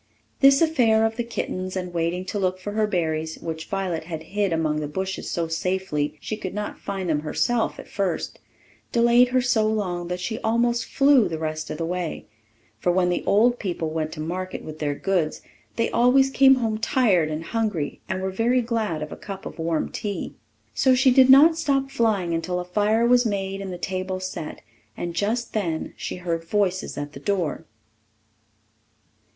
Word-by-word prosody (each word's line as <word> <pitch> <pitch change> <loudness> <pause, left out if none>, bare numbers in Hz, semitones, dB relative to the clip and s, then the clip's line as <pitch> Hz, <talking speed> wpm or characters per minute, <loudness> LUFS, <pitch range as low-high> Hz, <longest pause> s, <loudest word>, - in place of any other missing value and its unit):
This 275 +3 +6
affair 230 -9 +3
of 225 0 -1
the 240 - -1
kitten's, 185 -5 -4
and 180 -1 -4
waiting 170 +2 -1
to 205 - -3
look 185 -1 0
for 205 +2 -5
her 215 0 +1
berries, 160 -4 -1
which 160 -1 -5
Violet 190 -5 -2
had 160 -2 -6
hid 205 -2 +1
among 155 -2 0
the 150 - -3
bushes 190 +5 -4
so 170 -1 -1
safely 165 -3 -1
she 215 - -4
could 190 -3 -6
not 210 0 -4
find 195 -2 -4
them 155 -3 +1
herself 225 +10 0
at - - -10
first, 195 -4 -2 0.5
delayed 235 +1 +5
her 255 +1 +2
so 245 -3 +2
long 185 -5 -2
that 180 +1 -3
she 220 +5 -3
almost 235 +1 +1
flew 275 -4 +4
the 160 - -3
rest 155 0 -4
of - - -4
the 165 - -2
way; 175 -1 -3 0.5
for 175 - +2
when 180 0 +2
the 175 - -1
old 240 +4 +4
people 170 -5 -3
went 155 -1 -2
to - - -9
market 180 +4 -4
with 155 0 -8
their 145 -2 -1
goods, 175 -3 -1 0.3
they 230 - 0
always 265 +3 +4
came 270 0 +6
home 225 -4 -1
tired 215 -9 +2
and 155 +1 -4
hungry, 205 -8 -2
and 190 0 -2
were 190 - -1
very 240 +5 +2
glad 220 -9 -1
of 150 - -7
a - - -5
cup 195 -2 -8
of - - -8
warm 165 -1 -1
tea. 200 -4 -4 0.4
So 260 -1 +4
she 260 +1 +5
did 260 0 +6
not 315 +5 +7
stop 275 -4 0
flying 205 -9 +1
until 170 +2 -1
a 180 - -4
fire 210 +5 +2
was 245 0 +5
made 195 -3 -2
and 195 -1 -5
the 180 - -5
table 185 +1 -3
set; 185 -4 -6 0.4
and 175 -1 -4
just 220 +7 -1
then 170 -7 -2
she - - -5
heard 170 -2 -3
voices 185 +1 -1
at 145 0 -5
the - - -9
door. 175 -1 -2
190 Hz, 190 wpm, -24 LUFS, 165-230 Hz, 0.5 s, not